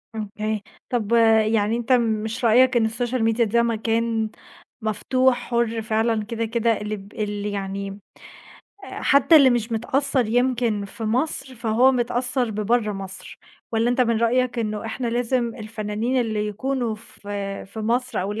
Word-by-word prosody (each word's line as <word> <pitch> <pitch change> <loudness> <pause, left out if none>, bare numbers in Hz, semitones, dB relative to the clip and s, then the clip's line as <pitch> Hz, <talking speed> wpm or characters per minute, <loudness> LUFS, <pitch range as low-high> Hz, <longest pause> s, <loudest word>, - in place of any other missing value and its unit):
أوكي، 215 0 -3 0.3
طَب 230 -4 -2 0.4
يعني 215 +1 +1
أنت 240 +2 -4
مش 225 0 +1
رأيك 250 +3 +5
إن 225 - +3
السوشيال 240 +1 -1
ميديا 225 +1 +2
ده 235 +2 +2
مكان 225 -1 0 0.5
مفتوح 250 +4 +1
حُر 235 -2 -1
فعلًا 220 0 0
كده، 230 +1 -3
كده 230 -1 0
اللي 210 0 -3
ب 200 0 -13
اللي 210 -2 -3
يعني 195 0 -4 0.9
آآ - - -8
حتّى 280 +4 +5
اللي 275 -4 +7
مش 235 -1 -1
متأثّر 260 +2 0
يمكن 240 -3 +1
في 220 +3 -7
مصر 255 +3 -1
فهو 235 +3 +3
متأثّر 245 0 0
ببرّه 215 +1 0
مصر 195 -1 -8 0.3
والّا 230 +2 +2
أنت 245 - 0
من 235 -2 +3
رأيك 245 +1 +1
إنه 215 -1 -2
إحنا 235 +2 -4
لازم 240 0 0
الفنّانين 220 +2 -2
اللي 215 -2 -1
يكونوا 240 +2 -2
في 215 +1 -13 0.5
في 210 +3 -8
مصر 245 +3 0
أو 195 +2 -2
اللي 220 - -5
230 Hz, 155 wpm, -23 LUFS, 215-245 Hz, 0.9 s, اللي